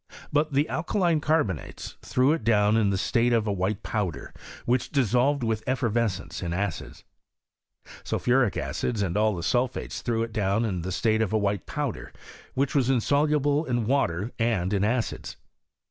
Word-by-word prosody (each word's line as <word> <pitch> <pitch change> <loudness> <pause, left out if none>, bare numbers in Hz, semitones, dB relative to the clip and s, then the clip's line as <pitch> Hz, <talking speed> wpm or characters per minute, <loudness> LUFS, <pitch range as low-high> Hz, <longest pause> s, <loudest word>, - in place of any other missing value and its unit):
But 150 0 +1
the 145 +3 +2
alkaline 170 -1 0
carbonates 145 - -1
threw 130 +3 +2
it 160 - -3
down 105 -1 +3
in 110 -3 +3
the 100 - 0
state 120 +5 +1
of 115 -2 +2
a 105 - 0
white 95 +2 -2
powder, 100 -7 -3 0.3
which 125 +1 +1
dissolved 135 +1 +2
with 110 -2 0
effervescence 115 - -1
in 85 -2 -3
acids. 95 -1 -4 1.0
Sulphuric 125 -4 +1
acid 110 -4 -2
and 90 -2 -2
all 105 0 +2
the 85 - -5
sulphates 125 +4 -1
threw 115 -2 0
it 115 -1 -6
down 105 +1 +1
in 95 -5 -2
the 95 +3 -4
state 110 +3 +1
of 110 -2 0
a - - +4
white 100 -3 -1
powder, - - -4 0.4
which 135 +1 0
was 135 -3 +2
insoluble 145 +3 +2
in 120 -4 -1
water 115 -5 0
and 105 -5 +1
in 100 -1 +1
acids. 115 +2 -2
115 Hz, 165 wpm, -26 LUFS, 100-130 Hz, 1.0 s, a